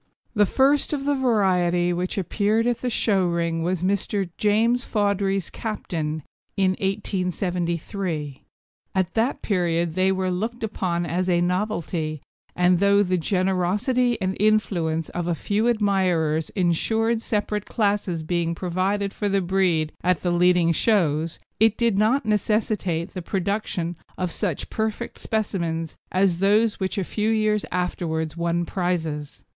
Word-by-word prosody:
The 205 -3 +3
first 275 +5 +2
of 275 -2 -2
the 290 - +2
variety 185 -9 +2
which 180 +3 -2
appeared 210 +4 +1
in 245 0 +2
the 250 - -1
show 200 -5 +2
ring 170 -1 -1
was 180 +1 -1
Mr. 195 0 0
James 225 +4 +2
Fawdry's 200 -3 0
Captain, 160 -8 -4 0.3
in 190 -1 +3
1873. 180 -5 -2 0.5
At 185 -1 0
that 230 +4 0
period 170 -4 0
they 185 +2 +2
were 190 -1 0
looked 225 +6 -3
upon 180 -5 -1
as 180 +2 -1
a 175 -1 +3
novelty, 175 -4 -1 0.4
and, 180 0 +3
though 200 +1 +4
the 185 -2 0
generosity 195 - +1
and 190 -1 -1
influence 185 -7 +1
of 175 -1 -3
a 175 - +1
few 210 +7 0
admirers 185 -8 +1
ensured 220 +6 +1
separate 210 -2 -2
classes 200 -6 0
being 170 0 -1
provided 190 +3 -1
for 205 - -2
the 195 0 +2
breed 180 -4 +1
at 180 -2 +2
the 175 - +1
leading 175 -1 +4
shows, 165 -5 +1 0.2
it 220 0 +4
did 230 -4 +2
not 230 +5 +2
necessitate 210 -5 0
the 185 - -5
production 185 -2 -2 0.2
of 180 -2 -2
such 180 -6 -3
perfect 220 +2 -3
specimens 170 -7 -2 0.2
as 185 -2 +2
those 210 +3 +3
which 190 0 -2
a 195 - +1
few 210 +4 -1
years 215 -1 +1
afterwards 160 -3 -2
won 170 0 0
prizes. 165 -5 -3
185 Hz, 140 wpm, -24 LUFS, 170-210 Hz, 0.5 s, though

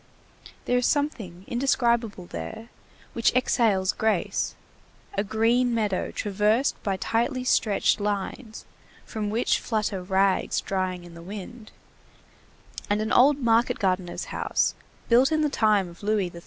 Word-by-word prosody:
There 250 0 +2
is 245 - +1
something 215 - -2
indescribable 235 -6 0
there 175 - -7 0.4
which 230 - +2
exhales 215 -6 +2
grace, 220 -5 -1 0.6
a 200 - 0
green 230 +3 +2
meadow 210 -4 -1
traversed 210 +5 0
by 195 -2 -1
tightly 240 +6 -1
stretched 215 -4 +2
lines, 210 +3 -4 0.4
from 215 -2 -4
which 225 +4 +1
flutter 215 -4 -2
rags 190 +1 +1
drying 185 -2 -3
in 175 -1 -12
the 170 - -11
wind, 210 +5 -9 1.2
and 205 +1 +1
an 215 +1 -2
old 275 +3 +5
market 235 -3 +2
gardener's 185 -3 -1
house, - - 0 0.3
built 250 +5 +4
in 310 0 +2
the 300 - +2
time 215 -7 +2
of 170 0 -14
Louis 205 -3 0
XIII. 170 - -10
215 Hz, 135 wpm, -25 LUFS, 190-240 Hz, 1.2 s, old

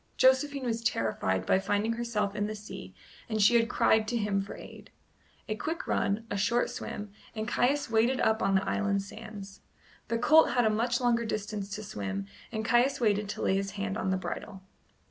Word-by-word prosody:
Josephine 265 +1 +3
was 230 -1 -1
terrified 110 - 0
by 190 - +3
finding 205 +3 0
herself 220 -4 -2
in 205 0 0
the 215 - -4
sea 210 0 -9 0.3
and 215 -1 -1
she 210 +3 +6
had 230 0 +4
cried 220 -3 +3
to 240 - 0
him 205 -2 0
for 195 - -7
aid. - - -12 0.6
A 215 - -1
quick 320 +9 -4
run, 205 +3 0
a 205 - -1
short 235 +5 +1
swim, 205 -1 -6 0.2
and 215 0 -3
Caius 280 +6 +1
waded 230 +3 +2
up 220 0 +2
on 195 - +2
the 190 - +1
island 200 -1 0
sands. 200 -1 -10 0.5
The 230 - 0
colt 305 +4 +5
had 245 -1 +3
a 215 - +4
much 235 +3 +1
longer 240 -2 +2
distance 210 -2 -3
to 215 - -6
swim, 100 - -4 0.3
and 220 -1 -3
Caius 240 +4 +3
waited 210 -3 +1
to - - -4
lay - - +2
his 195 0 -1
hand 200 0 -2
on 200 -4 -1
the 190 - +1
bridle. 190 +1 -6
215 Hz, 200 wpm, -29 LUFS, 200-235 Hz, 0.6 s, she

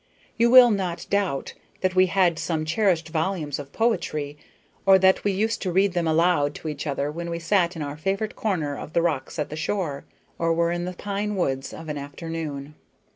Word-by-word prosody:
You 235 0 +3
will 250 -1 +9
not 180 -4 -2
doubt 195 -9 0 0.3
that 185 -1 +1
we 185 0 +5
had 175 -3 +2
some 160 -2 -2
cherished 170 -2 +1
volumes 160 -3 -2
of 140 -1 -8
poetry, 155 -11 -1 0.5
or 195 -1 +7
that 190 0 +3
we 205 - +2
used 220 +4 -1
to 185 - -1
read 190 +1 +2
them 175 -2 0
aloud 160 -3 +2
to - - -7
each 150 0 -5
other 140 +1 -1
when 170 +2 -5
we 170 - -3
sat 170 +1 +1
in 160 - -4
our 145 +1 -5
favorite 195 +6 -2
corner 160 -10 -1
of 155 - -8
the 170 - +3
rocks 160 -2 -2
at 150 - -3
the - - -4
shore, 155 -4 -2 0.3
or 165 0 +2
were 170 0 +2
in 175 0 -2
the 180 - -4
pine 205 +2 -3
woods 135 -7 -1
of 160 - -9
an 150 -1 -3
afternoon. 145 0 -6
170 Hz, 205 wpm, -24 LUFS, 150-195 Hz, 0.5 s, will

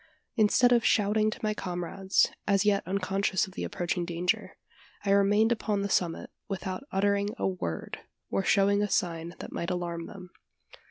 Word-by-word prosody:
Instead 240 +2 +4
of 240 -2 +4
shouting 215 +1 +3
to - - -6
my 215 0 +1
comrades 190 0 0 0.2
as 200 0 +3
yet 200 -1 +3
unconscious 195 +1 0
of 190 - -13
the - - -4
approaching 175 -2 -2
danger 175 +1 -2 0.5
I 200 - +2
remained 205 +3 +4
upon 210 -3 0
the 200 - -2
summit 175 -3 0 0.2
without 195 +4 -4
uttering 200 +1 +1
a - - 0
word, 175 - -4 0.3
or 195 - +1
showing 200 +1 +3
a 205 - 0
sign 170 -1 -1
that - - -8
might 170 - -3
alarm 170 -2 -3
them. 185 -3 -11
195 Hz, 165 wpm, -28 LUFS, 180-205 Hz, 0.5 s, Instead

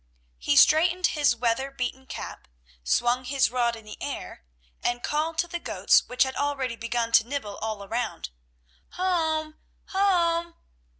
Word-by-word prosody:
He 145 - +1
straightened 350 - +5
his 290 -6 +3
weather 235 +3 0
beaten 265 0 -5
cap, - - -8 0.4
swung 240 - +1
his 265 -2 +1
rod 240 -2 +1
in 225 -1 -13
the 210 - -11
air, - - -6 0.4
and 240 0 -1
called 315 +2 -1
to 345 - +1
the 345 0 -4
goats - - +3
which 250 0 +3
had 265 0 -3
already 275 -4 -1
begun 230 0 -2
to 230 0 +5
nibble 245 -7 -4
all 215 -2 -4
around: 225 - -4 0.6
"Home! 320 -4 -1 0.3
Home!" 340 -3 +1
265 Hz, 145 wpm, -26 LUFS, 235-320 Hz, 0.6 s, straightened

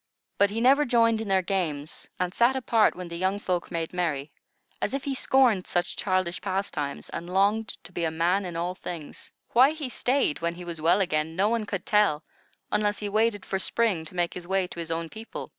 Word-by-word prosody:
But 200 - +5
he 220 +3 -3
never 275 +4 +5
joined 230 -3 +3
in 220 - -5
their 190 -1 +2
games, 165 -6 -3
and 180 0 -1
sat 240 +4 +3
apart 235 -4 +3
when 180 -1 -6
the 170 0 -6
young 190 +2 +1
folk 180 -4 -2
made 165 -1 -3
merry, 155 -5 -1 0.5
as - - 0
if 275 - -3
he 280 - -2
scorned 250 -7 +3
such 175 0 -1
childish 185 -2 -1
pastimes 165 -7 -3
and 170 - -6
longed 200 +4 +2 0.2
to - - -13
be 175 - -3
a 165 - +2
man 170 +5 +1
in 175 -2 -6
all 175 +2 -1
things. 170 -4 -8 0.2
Why 265 +5 +6
he 305 -4 -5
stayed 250 - 0
when 170 0 -1
he 175 0 -9
was 170 -2 -6
well 175 +5 +4
again, 160 -3 0
no 200 +4 +3
one 230 -2 -1
could 195 -2 -4
tell, 205 -8 +3 0.5
unless 210 0 +1
he 205 - -4
waited 215 -1 +1
for 190 - -2
spring 205 -5 +1
to 170 - -11
make 175 -1 0
his 175 -1 -8
way 190 0 +1
to - - -8
his 165 -1 -5
own 165 0 -2
people. 220 +7 -8
185 Hz, 220 wpm, -27 LUFS, 170-220 Hz, 0.5 s, Why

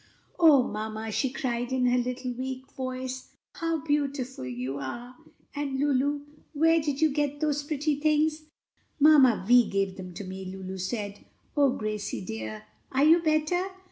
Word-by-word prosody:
"O 305 -6 +7
mamma!" 220 0 -4
she 265 +5 0
cried 245 -3 -2
in 260 -1 +1
her 250 0 +3
little 250 +1 -3
weak 260 +1 -6
voice, 255 0 -5 0.2
"how 330 -4 -2
beautiful 280 - -1
you 125 +3 -4
are! 240 - -6 0.4
And, 280 -2 -2
Lulu, 285 0 +1 0.3
where 325 +2 +4
did 290 -1 -2
you 315 -1 +4
get 290 0 -1
those 295 -1 0
pretty 295 0 -1
things?" 310 +1 +1 0.5
"Mamma 280 -9 +6
Vi 245 0 +6
gave 195 -1 -1
them 185 -1 -7
to 205 - -6
me," 190 0 -7
Lulu 190 0 -6
said. 205 +1 -4 0.3
"O 285 -2 +5
Gracie 215 -4 -4
dear, 110 -5 -6 0.3
are 265 +2 +2
you 325 +3 +7
better?" 310 +2 +1
260 Hz, 155 wpm, -27 LUFS, 215-295 Hz, 0.5 s, O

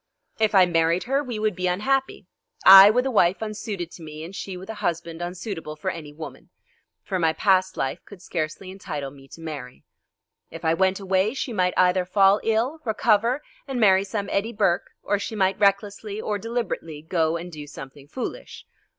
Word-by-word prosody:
If 215 -1 +2
I 185 -1 +7
married 165 0 +1
her 270 +3 0
we 245 -5 -5
would 215 -2 0
be 185 0 -1
unhappy. 260 +9 0 0.4
I 195 +1 +11
with 250 +4 +2
a 265 - 0
wife 185 -5 +3
unsuited 205 -5 -5
to - - -12
me, 155 -1 -8
and 180 +4 -9
she 190 -2 -6
with 185 +1 -10
a 220 - -5
husband 170 -1 -3
unsuitable 175 -3 -5
for 175 +5 -3
any 155 -4 -8
woman. 155 +2 -10 0.5
For 190 -2 -2
my 160 -2 +2
past 190 +1 +2
life 135 - -2
could 205 - -13
scarcely 175 +2 -4
entitle 150 -7 -6
me 135 -1 -16
to 165 - -13
marry. 145 -6 -8 0.7
If - - -9
I 160 - +3
went 190 +2 +1
away 195 +4 +1
she 260 -2 -3
might 180 -3 +1
either 180 0 +4
fall 195 +2 +4
ill, 230 +8 0
recover, 230 +3 +1 0.2
and 265 -2 -3
marry 195 -3 +5
some 200 0 -4
Eddie 220 +4 -1
Burke, 175 -4 +1
or 205 0 0
she 220 - -5
might 190 -2 +1
recklessly 200 +1 0
or 210 -1 -2
deliberately 195 -9 -4
go 165 -1 0
and 175 +1 -8
do 150 -2 -9
something 135 0 -11
foolish. 260 - -7
190 Hz, 190 wpm, -24 LUFS, 165-215 Hz, 0.7 s, I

